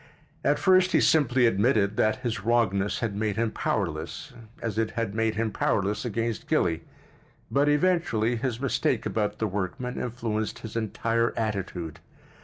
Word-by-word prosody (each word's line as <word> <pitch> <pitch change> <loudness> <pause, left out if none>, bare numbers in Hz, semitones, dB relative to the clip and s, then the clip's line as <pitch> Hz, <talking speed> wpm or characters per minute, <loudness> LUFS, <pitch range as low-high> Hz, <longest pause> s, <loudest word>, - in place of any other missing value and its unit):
At - - +3
first 185 -1 +4
he - - +5
simply 135 -5 +4
admitted 105 -2 +2
that 110 +4 +1
his 115 -5 -2
wrongness 105 -4 +1
had 110 -4 -1
made 105 -1 -1
him 115 0 0
powerless—as 110 - -4
it 110 -1 +1
had 115 -3 -1
made 110 0 0
him 110 0 0
powerless 105 +4 0
against 115 -1 -2
Gilly—but 90 - -2
eventually 145 -8 +2
his 120 0 -2
mistake 135 -1 0
about 105 -1 -1
the 110 - -1
workman 105 +6 -3
influenced 115 -3 -3
his 110 -1 -9
entire 115 +1 0
attitude. 95 -7 -3
110 Hz, 140 wpm, -27 LUFS, 105-120 Hz, -, he